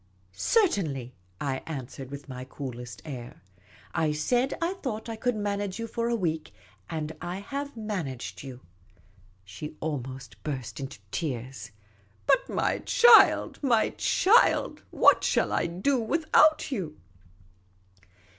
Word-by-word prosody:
" - - -35 0.2
Certainly," 155 - +1 0.3
I 135 -2 -2
answered, 135 -3 -6
with 140 +1 -8
my 130 -2 -7
coolest 125 -2 -8
air. 125 -9 -8 0.3
" 95 -3 -25
I 155 -1 +2
said 245 - +1
I 340 +2 0
thought 220 -5 -4
I 225 - -4
could 245 +2 0
manage 205 -2 -2
you 230 - -3
for 230 +1 -2
a 235 - +1
week; 160 -7 -2 0.3
and 155 -1 -4
I 175 +1 -4
have 280 +6 -5
managed 180 - -4
you." 130 -2 -9 0.8
She 125 +12 -8
almost 130 -7 -5
burst 135 -5 -4
into 135 -1 -6
tears. 125 - -4 0.3
" 100 0 -34
But, - - +3
my - - 0
child, 480 -2 +6
my 240 -6 +3
child, 435 +6 +3
what - - +5
shall - - +2
I - - +1
do 195 +11 0
without 310 +4 +3
you 175 - -4
160 Hz, 135 wpm, -28 LUFS, -, 0.8 s, child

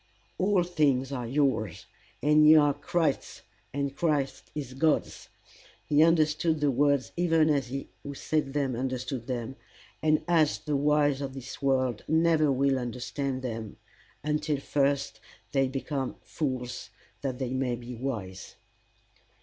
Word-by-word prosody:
"All 190 -1 +3
things 145 -6 +1
are 125 -4 -3
yours, 130 -5 0 0.4
and 150 +1 +5
ye 155 - +9
are 145 -2 +5
Christ's, 145 +1 -1 0.3
and 140 0 -2
Christ 150 -5 -1
is 140 -4 -5
God's:" 150 +3 0 0.6
he 150 0 +3
understood 160 -1 +3
the 145 -1 +2
words 140 0 +2
even 165 -3 +3
as 140 -4 +1
he 135 +2 -5
who 140 0 -7
said 150 -1 -1
them 140 -4 0
understood 125 -1 -3
them, 125 0 -4 0.4
and 155 0 +2
as 160 -4 +3
the 150 - -3
wise 145 -1 +2
of 135 -1 -5
this 135 +2 -8
world 130 -4 +1
never 160 -2 +3
will 135 0 +2
understand 130 +2 -3
them 115 -4 -5 0.5
until 150 0 0
first 140 -5 0 0.3
they 135 -1 +2
become 135 0 -3
fools 130 -5 -4 0.3
that 130 -3 -3
they 130 -2 -3
may 130 -2 0
be 120 +1 -8
wise. 110 -7 -5
140 Hz, 140 wpm, -28 LUFS, 130-150 Hz, 0.6 s, ye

